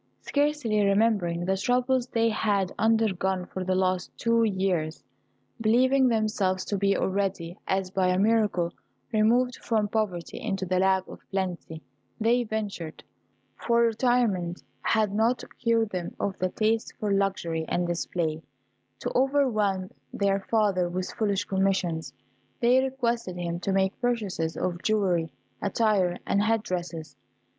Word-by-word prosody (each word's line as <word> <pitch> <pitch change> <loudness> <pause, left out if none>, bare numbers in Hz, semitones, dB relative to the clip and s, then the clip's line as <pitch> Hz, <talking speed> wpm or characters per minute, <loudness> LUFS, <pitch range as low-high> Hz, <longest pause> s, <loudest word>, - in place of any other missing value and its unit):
Scarcely 285 -8 +1
remembering 200 -4 +2
the 190 +1 +1
troubles 250 +4 +1
they 230 -1 +1
had 205 -3 0
undergone 190 -5 +1
for 185 +1 -5
the 185 0 0
last 185 -1 0
two 230 0 +2
years, 185 -6 -1 0.6
believing 255 +4 +4
themselves 215 -5 0
to 205 - -2
be 200 0 +2
already, 190 -3 -1
as 190 -1 0
by 190 -1 +1
a 180 0 +2
miracle, 205 -4 +2 0.4
removed 240 +3 +2
from 215 -3 0
poverty 205 -5 -2
into 195 -5 -2
the 185 0 +1
lap 190 0 +2
of - - -10
plenty, 180 -4 -4 0.4
they 235 +2 +3
ventured 205 -7 -5 0.5
(for 235 0 +1
retirement 225 -7 +1 0.2
had 215 -3 +1
not 225 +4 +1 0.2
cured 230 -2 +1
them 180 -2 -4
of 195 - -1
the 185 - +1
taste 220 +3 0
for 210 -1 -1
luxury 190 -5 0
and 175 - 0
display) 165 -2 -2 0.6
to - - -4
overwhelm 225 -9 +1 0.2
their 200 -1 +1
father 200 -6 +2
with 185 +1 -3
foolish 205 -2 0
commissions. 185 -7 0 0.5
They 245 +2 +5
requested 240 -8 -2
him 170 -1 -3
to 195 - -2
make 190 +2 0
purchases 205 -10 -1
of 175 -1 -2
jewelry, 185 -7 +1 0.3
attire, 200 -4 +1
and 200 - +2
head 220 0 +1
dresses. 165 -6 -5
200 Hz, 135 wpm, -27 LUFS, 185-225 Hz, 0.6 s, They